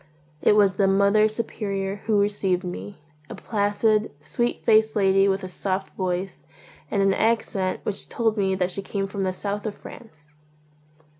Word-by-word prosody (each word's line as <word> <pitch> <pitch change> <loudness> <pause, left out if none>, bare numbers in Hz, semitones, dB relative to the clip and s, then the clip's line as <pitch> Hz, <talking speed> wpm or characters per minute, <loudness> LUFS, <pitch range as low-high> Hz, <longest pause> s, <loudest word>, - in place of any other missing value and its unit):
It - - +4
was 200 -3 +4
the 195 - +3
Mother 200 +2 +4
Superior 200 -3 -3
who 215 -2 +3
received 200 -3 0
me, 180 +2 -7 0.3
a - - -7
placid, 215 0 0
sweet 240 +10 -2
faced 220 0 +4
lady 195 -1 +4
with 195 0 0
a - - -4
soft 190 +1 -3
voice 185 0 -3 0.5
and 200 -3 +1
an 195 0 +3
accent 200 -4 0
which 200 -1 -3
told 225 -2 0
me 195 -2 +1
that 185 -1 0
she 195 - -2
came 195 0 -3
from 195 0 -5
the 190 -1 0
South 200 +2 -4
of 210 - -4
France. 155 -10 -14
200 Hz, 165 wpm, -24 LUFS, 190-210 Hz, 0.5 s, It